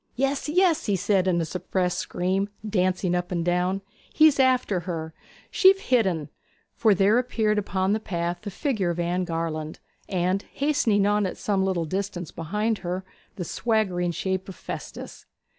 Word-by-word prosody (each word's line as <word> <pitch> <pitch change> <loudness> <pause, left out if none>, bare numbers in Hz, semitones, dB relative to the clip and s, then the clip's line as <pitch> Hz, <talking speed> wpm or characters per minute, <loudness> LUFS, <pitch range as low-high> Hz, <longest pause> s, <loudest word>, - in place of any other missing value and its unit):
'Yes, 275 +3 0
yes!' 335 -2 +3
he 205 - +2
said 190 0 +1
in 175 -2 +2
a - - -1
suppressed 180 +1 -1
scream, 190 +3 -1 0.2
dancing 185 -3 +1
up 180 +1 -1
and 170 -2 -1
down, 180 +2 0 0.3
'he's 310 -3 +5
after 255 -7 +3
her: 165 -2 -5 0.4
she've 390 -1 +6
hit 250 - +2
en!' 160 -5 -2 0.4
For 220 -3 +3
there 200 +5 +4
appeared 220 -4 +1
upon 190 -1 0
the 220 - +1
path 175 -3 -3
the 210 - -5
figure 210 - -1
of 170 0 -2
Anne 175 +1 0
Garland, 165 -2 -3 0.3
and, 185 +1 0
hastening 240 -9 +2
on 205 -1 +2
at - - -6
some 195 -2 0
little 185 -3 0
distance 180 -1 -4
behind 210 +7 -1
her, 185 +1 -4 0.3
the 180 -4 -4
swaggering 195 -5 0
shape 190 +2 -2
of 190 - -8
Festus. - - -8
190 Hz, 165 wpm, -25 LUFS, 175-215 Hz, 0.4 s, she've